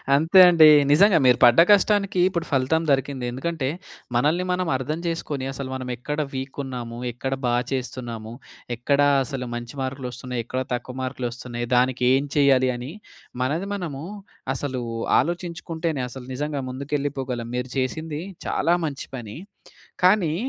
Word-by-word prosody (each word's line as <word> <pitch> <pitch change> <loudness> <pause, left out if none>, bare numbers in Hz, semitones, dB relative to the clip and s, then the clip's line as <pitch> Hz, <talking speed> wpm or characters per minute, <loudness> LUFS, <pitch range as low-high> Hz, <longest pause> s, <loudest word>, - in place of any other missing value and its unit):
అంతే 165 +6 +5
అండి. 165 -3 +7 0.2
నిజంగా 195 +5 +6
మీరు 125 -1 +6
పడ్డ 120 +3 +7
కష్టానికి 200 -1 +3
ఇప్పుడు 170 -3 -3
ఫలితం 140 +4 +2
దొరికింది. 135 -2 0
ఎందుకంటే 135 +1 -2 0.5
మనల్ని 150 +9 +2
మనం 180 -1 0
అర్థం 150 +5 -3
చేసుకొని, 150 -5 -3
అసలు 135 -1 -6
మనం 130 -1 -5
ఎక్కడ 150 +5 -4
వీక్ 130 0 -5
ఉన్నాము? 120 -3 -6
ఎక్కడ 130 +3 -4
బా 120 - +2 0.2
చేస్తున్నాము? 120 -4 -5 0.4
ఎక్కడ 140 +4 0 0.2
అసలు 125 -1 -5
మంచి 120 +1 -6
మార్కులు 130 0 -4
వస్తున్నాయి? 125 0 -5
ఎక్కడ 130 +2 -3
తక్కువ 125 +1 -4
మార్కులు 130 -1 -3
వస్తున్నాయి? 120 -1 -6
దానికి 125 0 +2
ఏం 135 +2 +2
చేయాలి? 135 -2 +4
అని 125 +4 -6 0.5
మనది 160 +9 -1
మనము 160 -7 -5 0.5
అసలు 130 -2 -3 0.4
ఆలోచించుకుంటేనే 165 -1 -3
అసలు 125 0 -9
నిజంగా 145 +1 -3
ముందుకెళ్ళిపోగలం. 135 -3 -3
మీరు 125 +1 -3
చేసింది 150 +4 -2 0.3
చాలా 170 - +2
మంచి 140 -3 -5
పని. 115 -1 -7 0.7
కానీ 185 -5 +4
135 Hz, 140 wpm, -23 LUFS, 125-160 Hz, 0.7 s, అండి